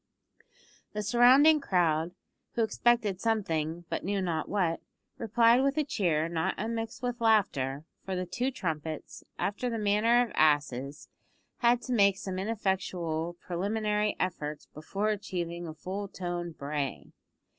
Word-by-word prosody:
The 210 0 -2
surrounding 260 +8 +6
crowd, 170 - +1 0.4
who 230 - +1
expected 220 -4 +1
something, 175 -7 -1
but - - -3
knew 200 +2 -1
not 170 -4 -2
what, 180 -5 0 0.4
replied 230 +1 +4
with 275 +2 +1
a 305 - +3
cheer 170 - 0
not 165 -1 -1
unmixed 225 +2 -4
with 245 -1 -2
laughter, 155 - +2 0.2
for 190 - -3
the 180 0 -2
two 245 +9 -1
trumpets, 160 - -5
after 210 +5 -1
the 230 - -2
manner 220 +4 +3
of 230 - -12
asses, 145 -2 +1 0.5
had 240 0 +3
to 255 - -2
make 200 -4 +4
some 185 -2 -4
ineffectual 185 -5 -2
preliminary 210 +3 -1
efforts 155 -5 -3
before 195 +7 -2
achieving 175 -4 -3
a 160 - -6
full 190 +6 -5
toned 175 -3 -5
bray. 140 -1 -4
190 Hz, 135 wpm, -29 LUFS, 165-225 Hz, 0.5 s, surrounding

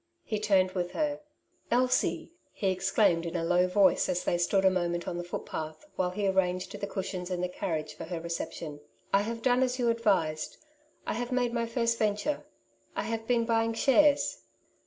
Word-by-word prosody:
He 215 - -2
turned 195 -3 +3
with 180 -1 -3
her. 295 +2 0
'^ - - -25 0.5
Elsie! 250 +5 +1
" - - -41
he 195 -2 0
exclaimed 185 -2 +2
in 170 +1 -5
a 170 - 0
low 180 +2 +3
voice 190 +1 +3
as 180 0 0
they - - +1
stood 190 +2 +2
a - - +8
moment 175 -1 -1
on - - -2
the - - -3
footpath, 160 - -6
while 180 -1 +1
he 200 +2 -1
arranged 185 -1 +1
the 200 0 -4
cushions 190 -2 -4
in 180 -1 -2
the 180 - 0
carriage 155 -4 -3
for 165 - -8
her 170 0 -4
reception, 165 -2 -5 0.3
"I 195 - +5
have 230 +2 -4
done 250 0 +3
as 255 -1 +1
you 245 -2 +2
advised; 190 -9 0 0.5
I - - -1
have 245 +2 -3
made 245 -2 +1
my 235 -1 0
first 230 0 0
venture; 215 +7 0 0.5
I - - -1
have 225 +1 -3
been 235 -2 +2
buying 230 0 +1
shares." 285 +3 +3
195 Hz, 200 wpm, -29 LUFS, 175-230 Hz, 0.5 s, a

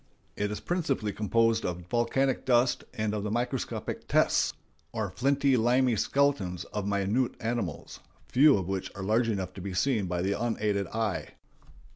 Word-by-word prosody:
It 105 0 -1
is 105 - -4
principally 145 - -1
composed 115 +1 +2
of 90 0 -3
volcanic 125 +5 +1
dust 125 0 +2
and 110 -1 -1
of 105 - -2
the 105 - -3
microscopic 120 +3 -3
"tests," - - +3 0.4
or 110 -4 -3
flinty 140 +5 +2
limy 125 +1 +3
skeletons 105 -9 +1
of 105 -1 -2
minute 100 +5 0
animals, 110 -9 -3 0.3
few 140 0 +5
of 95 -3 -3
which 95 -1 -3
are 100 - -5
large 115 +4 +2
enough 95 -4 -2
to 95 - -8
be 95 0 -5
seen 110 -1 +1
by 90 0 -1
the 100 +1 +1
unaided 105 -3 -1
eye. 110 -2 -3
110 Hz, 160 wpm, -28 LUFS, 100-125 Hz, 0.4 s, few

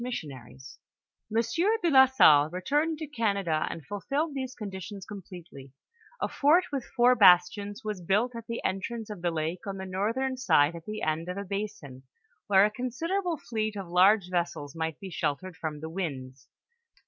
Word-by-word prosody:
80 240 -11 -4 1.0
Monsieur 330 - +1
de 340 - +2
la 265 -1 +8
Salle 155 - +6
returned 295 - 0
to 315 - -5
Canada 200 - -1
and 160 - -7
fulfilled 275 - -2
these 260 -2 -5
conditions 195 -2 -7
completely; 175 -9 -11 0.5
a - - 0
fort 310 +6 +3
with 275 -3 -2
four 245 0 +3
bastions 200 -1 +4
was 210 -4 -4
built 210 +8 +1
at 230 -1 -8
the 230 - -5
entrance 215 +3 -3
of 200 -4 -8
the 175 - +1
lake 165 +5 -3
on 195 -1 -4
the 190 - -6
northern 230 +8 -1
side 165 - +3
at 165 -1 -10
the 215 0 -5
end 160 +2 -1
of 180 - -4
a 200 - -4
basin, 190 -10 -6 0.5
where 195 -1 +6
a 210 - 0
considerable 330 - -2
fleet 215 -4 -3
of 195 -3 -6
large 185 +3 +4
vessels 170 -5 -2
might 160 -1 -3
be 190 -1 -8
sheltered 165 +3 -3
from 155 -2 -5
the 160 - -5
winds. 135 -8 -5
200 Hz, 170 wpm, -28 LUFS, 170-240 Hz, 1.0 s, la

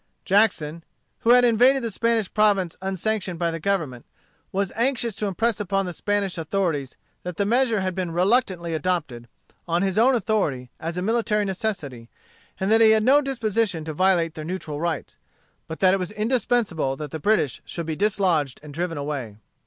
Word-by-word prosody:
Jackson, 170 -6 +2 0.4
who 230 - -1
had 245 0 +7
invaded 250 +3 +4
the 230 - -2
Spanish 230 -1 0
province 200 -5 +2
unsanctioned 190 -1 -2
by 170 0 0
the 165 - -5
Government, 155 -10 -2 0.5
was 195 -1 -1
anxious 235 -1 0
to 210 +2 -3
impress 220 +3 0
upon 195 -1 -1
the 180 - -5
Spanish 200 0 -1
authorities 160 -5 -2 0.3
that 180 -2 -6
the 200 - +1
measure 230 -1 +2
had 185 0 -1
been 180 -1 -3
reluctantly 180 -1 +1
adopted, 155 -8 -2 0.4
on 170 +2 +1
his 195 +1 +1
own 255 +3 +5
authority, 185 - -1
as 165 +2 -4
a 180 - -2
military 215 -1 +1
necessity; 175 - -4 0.5
that 220 +4 +3
he 220 - +7
had 220 0 +4
no 275 +5 +5
disposition 225 - -1
to 160 - -4
violate 175 -1 +2
their 155 - -7
neutral 160 -3 -5
rights; 170 -4 -3 0.5
but 160 - -7
that 185 -1 +5
it - - +3
was 180 - -3
indispensable 215 - 0
that 150 -1 -6
the 160 - -5
British 205 - +1
should 170 - -5
be 160 -1 -3
dislodged 180 -8 +1
and 150 -1 -10
driven 165 0 -3
away. 140 -7 -4
190 Hz, 175 wpm, -24 LUFS, 165-220 Hz, 0.5 s, had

